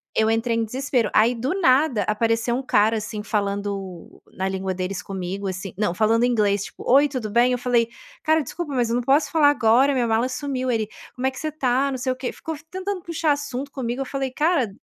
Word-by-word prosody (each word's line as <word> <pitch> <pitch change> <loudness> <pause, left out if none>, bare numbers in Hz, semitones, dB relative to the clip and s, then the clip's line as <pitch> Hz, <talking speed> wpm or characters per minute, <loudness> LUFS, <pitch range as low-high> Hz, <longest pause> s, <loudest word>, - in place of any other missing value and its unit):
eu 220 0 +3
entrei 225 +1 +1
em 230 - +1
desespero. 250 0 -1
Aí, 230 +3 +4
do 265 +11 -2
nada, 260 - +3
apareceu 230 +2 0
um 265 - -3
cara, 220 -2 +3
assim, 210 0 -5
falando 200 -3 -3
na 190 - -2
língua 190 0 -2
deles 185 0 -3
comigo, 195 +1 -5
assim 185 0 -5
não, 205 -5 0
falando 225 +3 +3
inglês, 205 -5 +1
tipo: - - -11
"Oi, 280 +3 +6
tudo 235 -6 -4
bem?". 240 +2 +4
Eu 250 - +1
falei: 240 -2 +2 0.4
"Cara, 315 -1 +3
desculpa, 330 -2 -5
mas 240 -2 +1
eu 230 - +1
não 245 - +1
posso 275 +5 +2
falar 300 -3 +5
agora, 255 +1 +4
minha 245 -3 +1
mala 225 +3 +1
sumiu". 260 0 -3
Ele: 220 -2 0 0.3
"Como 255 - -3
é - - 0
que 260 - -10
você 310 - -3
está?", 270 -2 +1
não 260 - -3
sei 255 +1 -1
o - - -12
quê, 255 -1 -4
ficou 320 -1 -6
tentando 375 +1 -4
puxar 330 -2 0
assunto 285 -1 -3
comigo, 250 -1 -3
eu 270 - -2
falei: 270 0 -3
"Cara" 295 - +1
245 Hz, 220 wpm, -23 LUFS, 215-275 Hz, 0.4 s, Oi